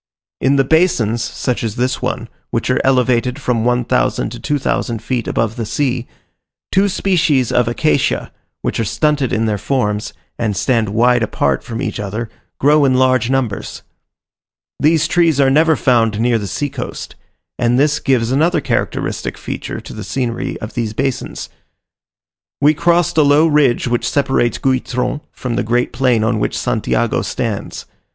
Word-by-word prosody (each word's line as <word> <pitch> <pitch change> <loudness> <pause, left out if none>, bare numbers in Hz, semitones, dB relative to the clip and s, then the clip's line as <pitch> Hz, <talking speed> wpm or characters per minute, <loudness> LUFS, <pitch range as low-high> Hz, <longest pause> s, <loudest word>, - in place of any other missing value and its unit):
In 135 +2 +2
the 135 - +4
basins, 125 - +2
such 125 -2 -3
as 110 -2 -3
this 125 +2 -1
one, 125 -2 -3 0.2
which 115 +2 -1
are 130 - +2
elevated 125 0 +2
from 125 -5 0
one 125 0 +1
thousand - - 0
to - - -8
two 145 - -1
thousand 120 -4 -2
feet 120 -1 -2
above 115 0 -1
the 115 - -2
sea, 125 0 -1 0.6
two 195 +2 +3
species 160 - +1
of 125 -2 +2
acacia, 135 +3 0 0.3
which - - -2
are - - +1
stunted 145 +3 0
in 115 0 +1
their 105 -2 -1
forms, 105 -3 -1 0.3
and 105 -4 -1
stand 115 -3 +1
wide 120 +3 +3
apart 110 - 0
from 115 +3 -5
each - - -3
other, 105 +3 -4 0.3
grow 150 +2 +4
in 130 -2 +3
large 130 -2 +2
numbers. 130 -6 -2 1.0
These 160 +1 +3
trees 165 -4 +2
are 135 -1 +4
never 160 +3 +4
found 115 -5 +2
near 120 0 +2
the 100 - -4
sea 145 +8 -3
coast; - - -6 0.4
and 120 +1 +2
this 150 +2 +2
gives 125 -3 +1
another 160 +5 +2
characteristic - - -2
feature - - -5
to - - -10
the - - -7
scenery 120 -3 -3
of 110 - -6
these 115 -3 -2
basins. 135 +2 -3 1.1
We 145 +2 +5
crossed 170 0 +2
a - - +7
low 145 +2 +5
ridge 145 -6 +2
which 120 -1 0
separates 135 -5 +1
Guitron 130 +1 -1
from 125 -3 -4
the - - +1
great 120 +3 0
plain 125 -3 +2
on 110 0 +1
which - - -1
Santiago - - 0
stands. - - -4
125 Hz, 165 wpm, -17 LUFS, 115-145 Hz, 1.1 s, a